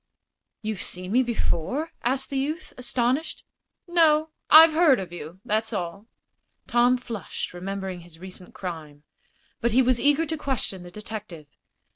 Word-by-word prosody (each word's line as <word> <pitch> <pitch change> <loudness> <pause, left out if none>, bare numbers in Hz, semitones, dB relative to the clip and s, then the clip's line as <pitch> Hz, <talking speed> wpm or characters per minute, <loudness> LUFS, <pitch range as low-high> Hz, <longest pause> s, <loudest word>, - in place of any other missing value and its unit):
"You've 215 -3 -3
seen 180 +1 -3
me 250 +4 +4
before?" 250 - -1
asked 265 +3 0
the 275 - -1
youth, 310 +6 -3
astonished. 250 +4 -1 0.4
"No; 320 -2 +4 0.2
I've 320 0 +9
heard 315 -5 +5
of 180 -2 -7
you. 175 +2 -9
That's 220 +2 0
all." 195 +2 -4 0.6
Tom 245 +1 +3
flushed, 230 -10 -6
remembering 190 0 -5
his 170 -1 -15
recent 185 +1 -11
crime. 155 -5 -7 0.6
But 235 -1 0
he 260 +2 +5
was 250 -1 +2
eager 290 +3 +3
to 320 +1 -3
question 260 -10 -2
the 175 - -10
detective. 210 -5 -8
225 Hz, 145 wpm, -25 LUFS, 185-275 Hz, 0.6 s, I've